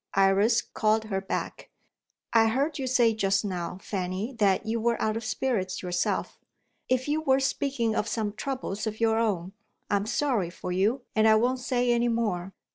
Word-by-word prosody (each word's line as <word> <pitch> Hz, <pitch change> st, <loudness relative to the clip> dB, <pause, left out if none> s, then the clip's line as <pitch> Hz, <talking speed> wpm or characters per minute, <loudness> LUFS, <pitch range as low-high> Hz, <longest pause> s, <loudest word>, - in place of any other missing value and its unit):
Iris 195 Hz, +3 st, +4 dB
called 220 Hz, 0 st, +1 dB
her 195 Hz, -3 st, -2 dB
back: 195 Hz, -, -4 dB, 0.6 s
"I 225 Hz, -1 st, +5 dB
heard 280 Hz, +7 st, 0 dB
you 265 Hz, -, -2 dB
say 240 Hz, -3 st, +3 dB
just 200 Hz, -1 st, +1 dB
now, 180 Hz, -2 st, -4 dB
Fanny, 190 Hz, +5 st, -3 dB
that 195 Hz, -3 st, +3 dB
you 225 Hz, +1 st, -1 dB
were 235 Hz, +1 st, +1 dB
out 215 Hz, 0 st, 0 dB
of 225 Hz, -, -3 dB
spirits 220 Hz, -5 st, -2 dB
yourself. 175 Hz, -1 st, -1 dB, 0.5 s
If 255 Hz, +1 st, +1 dB
you 300 Hz, +2 st, 0 dB
were 265 Hz, -3 st, +3 dB
speaking 265 Hz, -4 st, 0 dB
of 210 Hz, -, 0 dB
some 215 Hz, -2 st, -2 dB
troubles 230 Hz, -5 st, -4 dB
of 215 Hz, 0 st, -4 dB
your 225 Hz, -1 st, +2 dB
own, 195 Hz, -5 st, -1 dB, 0.4 s
I 205 Hz, -, +4 dB
am 200 Hz, +1 st, -3 dB
sorry 235 Hz, -6 st, 0 dB
for 180 Hz, +1 st, -6 dB
you, 200 Hz, +8 st, +1 dB
and 220 Hz, 0 st, +4 dB
I 220 Hz, -, +6 dB
won't 250 Hz, +4 st, +2 dB
say 250 Hz, -1 st, +1 dB
any 240 Hz, 0 st, +2 dB
more. 210 Hz, -6 st, -1 dB
220 Hz, 185 wpm, -27 LUFS, 195-245 Hz, 0.6 s, I